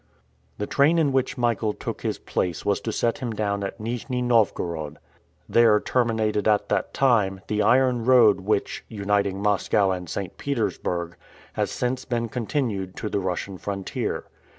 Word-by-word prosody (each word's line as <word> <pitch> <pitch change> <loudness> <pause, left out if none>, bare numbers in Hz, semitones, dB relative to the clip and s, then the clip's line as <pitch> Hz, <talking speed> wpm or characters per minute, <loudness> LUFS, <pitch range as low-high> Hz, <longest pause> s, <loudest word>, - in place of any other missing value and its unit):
The 105 - -2
train 145 +9 +3
in 155 -4 +3
which 130 -1 0
Michael 115 -3 +1
took - - -6
his - - -2
place 85 -5 -2
was 100 0 +1
to 110 - -3
set 115 +1 0
him 120 -3 -3
down 100 -1 -1
at 100 - -5
Nijni 125 +3 -3
Novgorod. 85 -10 0 0.5
There 115 -3 +5
terminated 110 -4 0
at 105 -1 +2
that - - 0
time, 105 -8 +2
the 105 +3 0
iron 125 -1 +3
road 120 -6 +6
which, 100 +1 -1
uniting 100 -2 0
Moscow 100 -1 +2
and 90 -2 -4
St. 95 -3 -5
Petersburg, 90 -10 -2 0.4
has - - -1
since 125 +1 -2
been 115 -2 -2
continued 110 -6 -2
to 105 - -4
the 100 - 0
Russian 95 0 -3
frontier. 100 -1 -3
105 Hz, 155 wpm, -24 LUFS, 100-120 Hz, 0.5 s, road